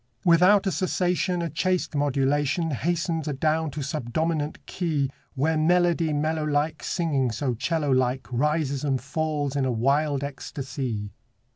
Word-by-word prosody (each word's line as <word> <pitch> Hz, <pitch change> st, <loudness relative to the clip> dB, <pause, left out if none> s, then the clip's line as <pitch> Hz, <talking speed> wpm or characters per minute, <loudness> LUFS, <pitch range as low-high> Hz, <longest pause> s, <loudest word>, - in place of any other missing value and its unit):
Without 185 Hz, +4 st, +5 dB
a 190 Hz, -, +1 dB
cessation 180 Hz, -1 st, 0 dB
A 170 Hz, -, -2 dB
chaste 185 Hz, +2 st, 0 dB
modulation 145 Hz, +3 st, +1 dB
Hastens 165 Hz, +2 st, -1 dB
adown 155 Hz, +2 st, 0 dB
to 145 Hz, 0 st, -5 dB
subdominant 150 Hz, +3 st, -2 dB
key, 150 Hz, -7 st, -1 dB, 0.2 s
Where 155 Hz, +4 st, +1 dB
melody 170 Hz, 0 st, +3 dB
mellow 155 Hz, +1 st, 0 dB
like 150 Hz, +1 st, 0 dB
Singing 145 Hz, -7 st, 0 dB
so 130 Hz, +2 st, -1 dB
'cello 150 Hz, +4 st, -1 dB
like 130 Hz, 0 st, +1 dB
Rises 140 Hz, +1 st, 0 dB
and 135 Hz, -3 st, +1 dB
falls 145 Hz, +1 st, -2 dB
in 140 Hz, -, +1 dB
a 130 Hz, -, +1 dB
wild 140 Hz, +4 st, +1 dB
ecstasy. 130 Hz, -6 st, -4 dB
150 Hz, 135 wpm, -25 LUFS, 135-165 Hz, 0.2 s, Without